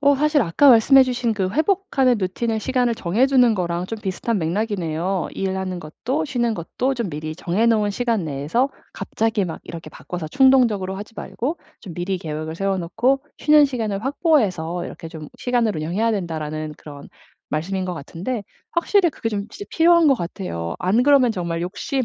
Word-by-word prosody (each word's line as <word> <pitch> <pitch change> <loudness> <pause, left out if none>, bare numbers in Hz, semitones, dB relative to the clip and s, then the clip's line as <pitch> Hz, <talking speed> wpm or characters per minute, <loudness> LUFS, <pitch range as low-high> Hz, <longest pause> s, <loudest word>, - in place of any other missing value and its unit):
어 285 0 +5
사실 300 0 +3
아까 210 +10 +4
말씀해 265 +3 +7
주신 250 -2 -1
그 190 -2 -1
회복하는 310 - +2
routine을 220 +4 -1
시간을 250 -2 +1
정해주는 245 +5 +3
거랑 175 -1 -2
좀 225 +1 -5
비슷한 210 +2 -2
맥락이네요. 180 -1 -1
일하는 190 -1 -3
것도 255 - -3
쉬는 240 -5 0
것도 245 +9 -2
좀 235 -6 -3
미리 155 +1 -5
정해 190 +7 0
놓은 215 -3 +3
시간 225 -3 -1
내에서 155 - 0 0.2
갑자기 220 -2 -1
막 165 -3 -6
이렇게 170 0 -9
바꿔서 175 -3 -6
충동적으로 230 - +3
하지 210 +3 -9
말고 295 +12 -4 0.2
좀 185 -6 -9
"미리 180 +3 -2
계획을 155 -1 -5
세워 195 +1 0
놓고 245 +11 0 0.2
쉬는 300 -1 +6
시간을 225 -6 -2
확보해서 205 - +1
이렇게 - - -8
좀 155 -3 -9
시간을 240 -5 0
운영해야 180 +9 0
된다."라는 155 -5 -3
그런 145 -2 -11 0.4
말씀인 185 +5 -2
것 180 - -3
같은데 180 - -5 0.3
확실히 345 0 +3
그게 225 - -4
좀 205 -2 -3
진짜 405 - -8
필요한 335 0 +5
것 275 - +5
같아요. 170 - -5
안 200 +7 +2
그러면 275 -4 +5
정말 170 -4 -3
욕심이 250 +8 -2
205 Hz, 405 characters per minute, -22 LUFS, 170-255 Hz, 0.4 s, 말씀해